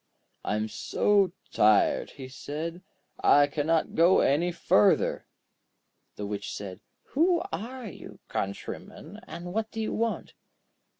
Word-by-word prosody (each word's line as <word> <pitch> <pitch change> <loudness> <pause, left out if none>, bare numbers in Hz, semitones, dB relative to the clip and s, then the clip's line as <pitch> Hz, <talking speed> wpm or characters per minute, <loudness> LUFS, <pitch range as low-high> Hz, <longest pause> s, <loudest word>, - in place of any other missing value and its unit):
'I - - -1
am 105 +1 -1
so 200 - +2 0.2
tired,' 105 -1 +4
he 135 -2 -9
said; 155 +6 -6 0.4
'I 145 0 +7
cannot 155 +3 0
go 170 +3 +5
any 165 +6 +2
further.' 105 -11 +3 0.9
The 105 - -5
Witch 100 0 -4
said: 95 -1 -7 0.3
'Who 340 +4 +2
are 235 +9 -5
you, 195 - -10
countryman, 155 - -5
and 175 +1 -7
what 220 +1 -1
do 225 - -7
you 220 - -1
want?' 230 0 -2
165 Hz, 125 wpm, -28 LUFS, -, 0.9 s, I